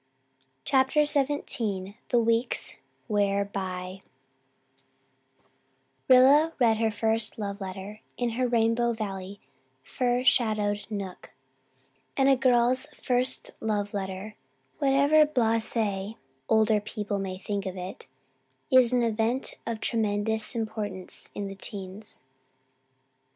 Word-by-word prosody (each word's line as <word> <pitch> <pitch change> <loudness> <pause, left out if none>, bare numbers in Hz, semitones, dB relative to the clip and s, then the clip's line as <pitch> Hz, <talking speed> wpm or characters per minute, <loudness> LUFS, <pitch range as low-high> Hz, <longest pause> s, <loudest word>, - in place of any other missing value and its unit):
CHAPTER 270 +3 +3
XVII 240 -9 0
THE 245 - +3
WEEKS 230 +1 +1 0.3
WEAR 200 -2 +1
BY 185 -1 -5 2.1
Rilla 275 +5 +6
read 230 -4 +4
her 225 0 +2
first 220 +1 -1
love 200 -1 -4
letter 195 +2 -7 0.2
in 240 -1 0
her 250 +2 0
Rainbow 235 0 +2
Valley 200 -2 -5 0.4
fir 245 - 0
shadowed 215 -5 +2
nook, 200 -4 -6 0.9
and 270 0 +4
a 270 - +6
girl's 250 -1 +2
first 255 +1 -1
love 205 -2 -1
letter, 195 +1 -4 0.5
whatever 285 +2 +5
blase, 230 -6 0 0.7
older 220 -1 +4
people 210 -1 -4
may 190 -1 -4
think 200 0 -3
of 190 0 -5
it, 180 +1 -7 0.6
is 255 -2 +6
an 245 -1 +3
event 230 +3 0
of 230 -1 -2
tremendous 220 0 -1
importance 210 -4 -4
in 205 - -3
the 195 - -5
teens. 195 -2 -6
220 Hz, 110 wpm, -27 LUFS, 200-245 Hz, 2.1 s, Rilla